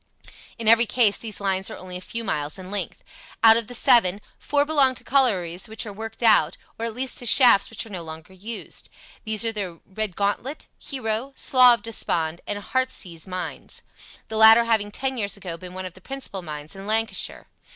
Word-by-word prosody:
In 230 -2 -5
every 230 +1 +7
case 220 -4 +3
these 220 -3 -5
lines 195 -1 -1
are - - -8
only 185 -1 -9
a 180 - -6
few 230 +5 -5
miles 150 -7 -2
in 185 0 -10
length. 205 - -4 0.4
Out 225 -1 +8
of 230 -2 -1
the 245 - -5
seven, 200 -5 +4 0.2
four 290 0 0
belong 280 -4 +2
to - - -7
collieries 195 -8 +1
which 220 +2 -5
are 205 - -7
worked 225 +3 -8
out, 225 -2 +4 0.2
or 230 - 0
at 225 - -6
least 255 0 -1
to 245 - -1
shafts 235 -4 +6
which 225 - -5
are 225 - -13
no 180 -3 -5
longer 160 +2 -10
used. 210 +5 -7 0.4
These 220 +1 +1
are 225 - +2
the 190 -6 -5
Redgauntlet, 205 - -3
Hero, 255 0 -4
Slough 250 -2 +6
of 205 - -22
Despond, 170 -7 -2
and 205 - -2
Heartsease 200 -6 -3
mines, 185 -1 -6 0.4
the 220 - -5
latter 220 +1 +8
having 220 -3 0
ten 265 +4 -3
years 205 -1 -2
ago 180 -4 -7
been 180 +1 -11
one 185 0 -6
of 185 - -8
the 185 - -17
principal 270 -5 -5
mines 150 -1 -8
in 195 +1 -10
Lancashire. 225 +1 -1
215 Hz, 200 wpm, -23 LUFS, 185-235 Hz, 0.4 s, Out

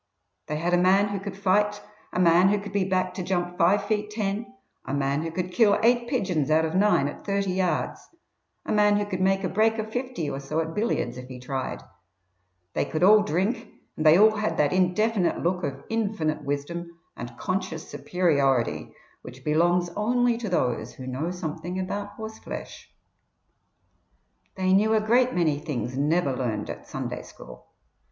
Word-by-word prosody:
They 150 - -2
had 170 +3 -1
a 175 - +5
man 195 +3 +4
who 200 -1 -3
could 195 0 -7
fight, 205 +2 +2 0.3
a - - -2
man 180 +1 +5
who 205 - +2
could 205 0 -7
be 200 -2 +1
backed 185 -1 0
to - - -2
jump 175 -1 -2
five 180 +4 +3
feet 210 -1 -1
ten, 210 +2 -3 0.3
a 130 - -3
man 140 +1 0
who 165 - -3
could 180 +2 -4
kill 205 0 +4
eight 240 +1 +3
pigeons 180 - 0
out 160 +1 +3
of 160 - -3
nine 195 -7 +3
at 145 - -8
thirty 200 -1 -1
yards, 185 -1 -1 0.6
a - - -3
man 210 -1 +4
who 205 - 0
could 190 -2 -4
make 195 +1 +2
a - - +1
break 220 +4 +2
of 220 0 -4
fifty 250 - -3
or 135 -1 -3
so 140 +3 -3
at 160 0 -2
billiards 145 - -1
if 125 - -9
he 130 -1 -9
tried; 130 +1 -4 0.9
they - - +1
could 160 +1 -2
all 210 +3 +7
drink, 200 +3 -1 0.3
and 155 - -3
they 155 +1 +7
all 215 +2 +7
had 215 0 -1
that 145 -1 +2
indefinite 185 +2 +1
look 180 +1 0
of 135 -2 -4
infinite 200 -9 -1
wisdom 170 +5 -4 0.2
and 120 0 -8
conscious 185 -4 -3
superiority 140 -9 0 0.3
which 130 +1 -12
belongs 175 +3 +2
only 240 +3 +2
to 230 -3 -4
those 125 -9 -1
who 130 - -9
know 130 +6 -3
something 175 0 -5
about 200 +2 -4
horseflesh. 220 0 -8 1.7
They 185 0 +1
knew 215 +3 +4
a - - +4
great 245 +4 +2
many 155 -5 +1
things 140 -5 -4
never 145 0 +1
learnt 115 -5 -2
at - - -10
Sunday - - -5
school. - - -13
180 Hz, 180 wpm, -26 LUFS, 155-205 Hz, 1.7 s, all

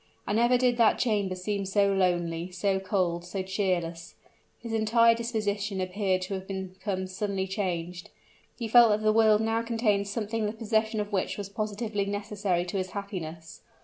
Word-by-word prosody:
And 205 - 0
never 240 +2 +4
did 245 -1 +2
that 230 -2 +4
chamber 205 -6 0
seem 200 +2 -2
so 200 +1 +2
lonely, 175 -2 0
so 190 +2 0
cold, 185 -3 -1
so 185 +2 -4
cheerless. 180 -4 -2 0.4
His 230 -1 -7
entire 230 +1 +4
disposition 210 -4 -2
appeared 185 0 0
to 185 - -4
have 190 0 -5
become 190 0 -4
suddenly 190 +1 -2
changed; 180 -3 -3 0.5
he 235 - -3
felt 235 +1 +7
that 210 0 +1
the 215 0 +4
world 220 -1 +5
now 225 +1 +1
contained 225 -4 0
something 215 +1 -2
the 210 - -3
possession 220 0 0
of 210 0 -3
which 190 - -1
was 200 -1 -5
positively 210 0 -2
necessary 205 -3 -1
to 180 +2 -3
his 185 0 -3
happiness. 170 -6 -6
200 Hz, 170 wpm, -28 LUFS, 185-220 Hz, 0.5 s, felt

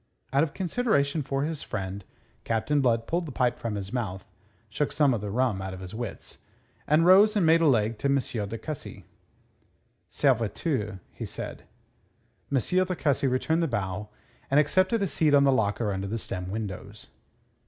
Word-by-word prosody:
Out 140 - +4
of 155 -2 -1
consideration 170 -7 +1
for 135 0 -2
his 155 0 -3
friend, 100 -2 -5 0.4
Captain 130 +6 +1
Blood 115 -3 +2
pulled 170 +4 -1
the - - -6
pipe 125 -1 0
from 115 -3 -3
his 100 +1 -5
mouth, 100 -7 -3 0.4
shook - - -2
some 145 -3 +3
of 115 - -2
the 105 - -4
rum 115 -3 0
out 95 0 -5
of - - -10
his 95 +1 -8
wits, 115 -1 -7 0.5
and 155 +3 +4
rose 200 +4 +7
and 200 -5 +3
made 165 +1 +5
a 165 - +4
leg 115 -4 +2
to - - 0
M. 140 0 +3 0.3
de 115 - -4
Cussy. 145 +5 -7 1.0
"Serviteur!" 115 - 0 0.2
said - - -6 0.8
he. 140 - -1 0.2
M. 185 - +3
de 185 - -2
Cussy 140 -4 +1
returned 160 +6 +1
the 165 - +1
bow 105 -4 -3 0.4
and 140 - +4
accepted 185 +8 +2
a - - +1
seat 155 -4 +3
on 140 - +6
the 140 - +5
locker 105 -3 +1
under 95 +1 -3
the 110 +3 -2
stem 90 -4 -5
windows. 100 0 -6
130 Hz, 180 wpm, -27 LUFS, 105-155 Hz, 1.0 s, rose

